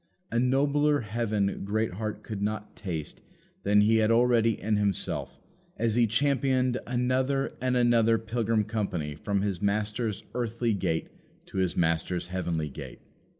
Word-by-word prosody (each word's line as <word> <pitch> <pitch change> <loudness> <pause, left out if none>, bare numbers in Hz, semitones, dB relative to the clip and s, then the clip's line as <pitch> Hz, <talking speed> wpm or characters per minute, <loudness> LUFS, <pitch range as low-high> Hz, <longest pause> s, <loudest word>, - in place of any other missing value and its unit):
A 115 - +1
nobler 145 +3 +2
heaven 105 -2 -1
Greatheart 105 +1 -2
could 105 -3 -5
not 105 0 -3
taste 80 -7 -5 0.4
than 105 +1 +4
he 110 +2 +4
had 110 0 +3
already 115 -2 +3
in 105 +2 0
himself, 100 -3 -1 0.4
as 115 -1 +1
he 120 0 +4
championed 130 +1 +1
another 130 +2 0
and 130 0 +1
another 115 -2 +4
pilgrim 115 -1 0
company 100 -8 -2
from 100 +6 -1
his 100 -4 -2
Master's 105 +1 -1
earthly 115 -1 -1
gate 80 -4 -1 0.4
to - - -8
his 95 -2 0
Master's 85 +2 0
heavenly 85 -4 -1
gate. 70 - -9
110 Hz, 140 wpm, -28 LUFS, 100-120 Hz, 0.4 s, than